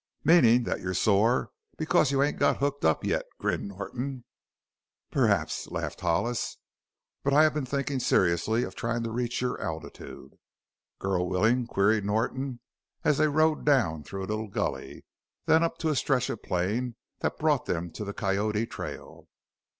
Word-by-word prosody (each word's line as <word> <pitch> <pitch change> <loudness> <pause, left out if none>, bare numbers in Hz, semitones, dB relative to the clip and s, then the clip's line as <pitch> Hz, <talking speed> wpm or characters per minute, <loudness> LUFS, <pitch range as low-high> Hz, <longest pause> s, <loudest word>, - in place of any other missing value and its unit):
"Meanin' 125 -8 +6
that - - -2
you're 90 0 -3
some - - +1
sore 115 +5 +2 0.3
because 155 -3 +2
you 140 0 +3
ain't 145 - -1
got 140 - +3
hooked 140 0 -1
up 80 - +2
yet?" - - 0
grinned - - -1
Norton. 125 +7 -5 0.9
"Perhaps," - - +1
laughed - - -5
Hollis. 95 +8 0 0.7
"But 140 - +1
I 155 - +7
have 155 - +4
been 145 -3 -2
thinking 140 0 -1
seriously 110 +2 +2
of 95 - -5
trying 115 +2 -2
to 115 - -3
reach 120 +1 -2
your 125 0 -2
altitude." 80 0 -7 0.6
"Girl 90 -2 -1
willin'?" 115 +6 +2
queried 105 0 +2
Norton, 120 +5 -1 0.4
as 150 -2 +2
they 155 - +5
rode 155 +1 +2
down 115 - +2
through 95 +4 -6
a 95 - -4
little 110 +1 -2
gully, 100 - -4 0.4
then 160 - +5
up 165 0 0
to 160 - -1
a 155 - +1
stretch 130 -2 +1
of 115 - -6
plain 110 +7 -1 0.2
that - - -2
brought 150 -4 +1
them 85 0 -2
to 105 - -6
the 100 - -4
Coyote 105 +2 0
trail. - - -8
120 Hz, 165 wpm, -28 LUFS, 100-140 Hz, 0.9 s, I